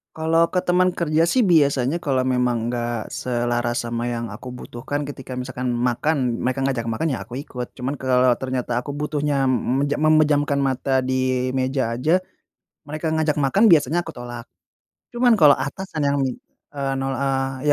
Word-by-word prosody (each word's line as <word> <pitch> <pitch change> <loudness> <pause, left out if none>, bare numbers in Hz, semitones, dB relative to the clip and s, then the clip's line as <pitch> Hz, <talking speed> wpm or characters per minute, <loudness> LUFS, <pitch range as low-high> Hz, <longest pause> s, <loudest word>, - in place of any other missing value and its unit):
Kalo 165 +1 +2
ke 180 - -1
teman 180 0 +2
kerja 165 0 +1
sih 250 +7 +3
biasanya 145 - +3
kalo 130 -4 0
memang 125 -2 0
enggak 120 -2 -3
selaras 120 -1 -1
sama 120 0 -3
yang 115 -2 -3
aku 115 +5 -9
butuhkan, 125 +4 -5
ketika 135 -3 -7
misalkan 125 0 -4
makan, 125 +1 0
mereka 130 +1 -1
ngajak 125 -4 -1
makan, 135 +7 -1
ya, 125 - -2
aku 125 - -9
ikut. 125 -4 -7
Cuman 130 +2 -4
kalo 130 -1 +3
ternyata 125 -2 -2
aku 135 +4 -6
butuhnya 150 -1 -1
m 130 +1 +1
meje 145 0 0
memejamkan 150 -2 +3
mata 130 0 0
di 130 0 0
meja 130 -2 -1
aja, 175 +7 +2 0.6
mereka 155 +1 -3
ngajak 155 -1 +1
makan, 145 +10 +3
biasanya 160 +2 +4
aku 165 - -7
tolak. 120 0 -8 0.6
Cuman, 245 -1 +3
kalo 150 -8 +6
atasan 155 +1 -4
yang, 140 0 +1 0.6
eee, 135 -1 -1
nol 135 0 -1
eee, 135 0 -1
135 Hz, 165 wpm, -22 LUFS, 125-150 Hz, 0.6 s, kalo